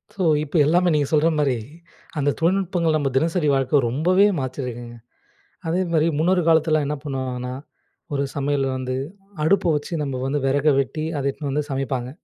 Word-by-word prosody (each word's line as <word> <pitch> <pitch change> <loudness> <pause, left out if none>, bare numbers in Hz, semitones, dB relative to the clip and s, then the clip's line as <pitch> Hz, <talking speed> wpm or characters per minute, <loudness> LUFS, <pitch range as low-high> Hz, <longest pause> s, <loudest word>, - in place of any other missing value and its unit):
So, 190 - -2 0.2
இப்ப 155 +3 -8
எல்லாமே 175 +3 +3
நீங்க 145 -2 +1
சொல்ற 155 +1 +3
மாரி, 135 -5 +1 0.6
அந்த 145 0 +1
தொழில்நுட்பங்கள் 175 -2 +1
நம்ம 140 -2 0
தினசரி 165 +1 +1
வாழ்க்க 135 +1 +2
ரொம்பவே 180 - +3
மாத்தியிருக்குங்க. 125 -2 -5 0.7
அதே 175 +3 +1
மாரி 160 +1 +3
முன்னொரு 180 +2 +3
காலத்தில 155 -1 +3
என்ன 150 0 -2
பண்ணுவாங்கன்னா, 130 -3 -4 0.6
ஒரு 140 0 0
சமையல்ல 140 -1 0
வந்து 130 0 -3 0.5
அடுப்ப 175 -1 +3
வச்சு 150 +4 -4
நம்ம 135 -3 -3
வந்து 145 +2 0
வெறக 140 +3 +1
வெட்டி, 155 +3 -4
அத 140 - -3
எடுத்துன்னு 140 0 -4
வந்து 150 0 -2
சமைப்பாங்க. 130 -2 -2
145 Hz, 155 wpm, -22 LUFS, 135-160 Hz, 0.7 s, எல்லாமே